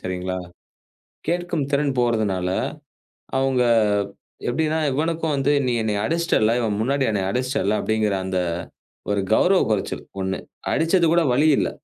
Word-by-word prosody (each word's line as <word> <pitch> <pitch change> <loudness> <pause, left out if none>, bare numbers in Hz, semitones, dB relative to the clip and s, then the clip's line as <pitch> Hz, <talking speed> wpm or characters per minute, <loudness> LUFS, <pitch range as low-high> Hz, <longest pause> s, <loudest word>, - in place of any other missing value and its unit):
சரிங்களா? 95 0 -3 0.9
கேட்கும் 175 -4 -1
திறன் 140 -2 +1
போறதுனால 105 -6 0 0.9
அவங்க 135 -2 +2 0.9
எப்படின்னா, 155 +4 0
இவனுக்கும் 160 +2 -1
வந்து 135 +1 +1
நீ 125 - +1
என்னைய 105 -1 -1
அடிச்சிட்டல்ல, 165 -10 +2
இவன் 105 -3 -1
முன்னாடி 135 +4 +1
என்னை 100 -2 0
அடிச்சிட்டல்ல 125 -4 0
அப்படிங்கிற 110 -2 0
அந்த 95 0 -2 0.7
ஒரு 100 -1 +1
கௌரவ 185 +9 +4
குறைச்சல் 105 - -2 0.2
ஒண்ணு. 95 0 -1 0.3
அடிச்சது 165 +2 +3
கூட 170 - +4
வலி 150 +5 +3
இல்ல. - - +1
125 Hz, 125 wpm, -22 LUFS, 105-155 Hz, 0.9 s, கௌரவ